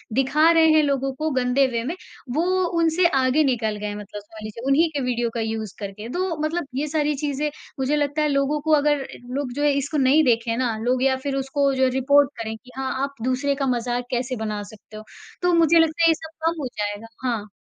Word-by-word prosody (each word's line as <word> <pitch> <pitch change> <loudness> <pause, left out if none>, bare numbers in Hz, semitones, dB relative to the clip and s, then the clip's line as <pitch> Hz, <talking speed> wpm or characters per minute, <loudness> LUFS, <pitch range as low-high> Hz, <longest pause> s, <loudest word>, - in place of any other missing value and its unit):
दिखा 300 +5 +4
रहे 325 -1 +5
हैं 310 - +6
लोगों 275 -2 0
को 310 +4 -2
गंदे 255 +1 +2
वे 235 -2 -2
में, 315 +9 -3 0.4
वो 325 - +2 0.4
उनसे 335 +2 +3
आगे 265 +1 +2
निकल 230 -5 0
गए 210 - -6
हैं 205 - -4
मतलब 205 0 -8
समझ 215 +1 -13
लीजिए 215 +3 -8
उन्हीं 315 +4 +4
के 290 - -2
वीडियो 240 -1 0
का 235 - -3
यूज़ 220 -2 -3
करके। 205 +2 -7
तो, 355 +1 -2
मतलब 310 -1 -2
ये 290 +3 -1
सारी 300 -1 0
चीज़ें 290 +1 -2 0.3
मुझे 270 +3 +1
लगता 290 +1 0
है 300 - +2
लोगों 280 +1 +1
को 315 +2 -1
अगर 290 -2 +1 0.3
लोग 280 -3 -2
जो 290 +2 -2
है 295 - +4
इसको 285 +3 -2
नहीं 280 +3 +4
देखें 230 -2 +1
ना, 245 -3 0
लोग 255 +2 +1
या 265 -1 +3
फिर 275 -1 -1
उसको 275 +1 0
जो 260 0 +3
रिपोर्ट 280 +1 +4
करें, 220 0 -4
कि 255 +2 -18
हाँ, 265 0 -2
आप 280 0 -4
दूसरे 265 +2 0
का 275 -1 -1
मज़ाक 245 +1 -2
कैसे 250 +1 -1
बना 210 -1 -3
सकते 215 +1 -13
हो? 215 - -9 0.4
तो 355 0 +2
मुझे 335 0 +5
लगता 325 +1 +2
है 330 - +6
ये - - +6
सब 320 +1 -9 0.2
कम 330 -1 0
हो 270 - -2
जाएगा, 205 +2 -3 0.2
हाँ। 220 -4 -2
270 Hz, 230 wpm, -23 LUFS, 240-300 Hz, 0.4 s, हैं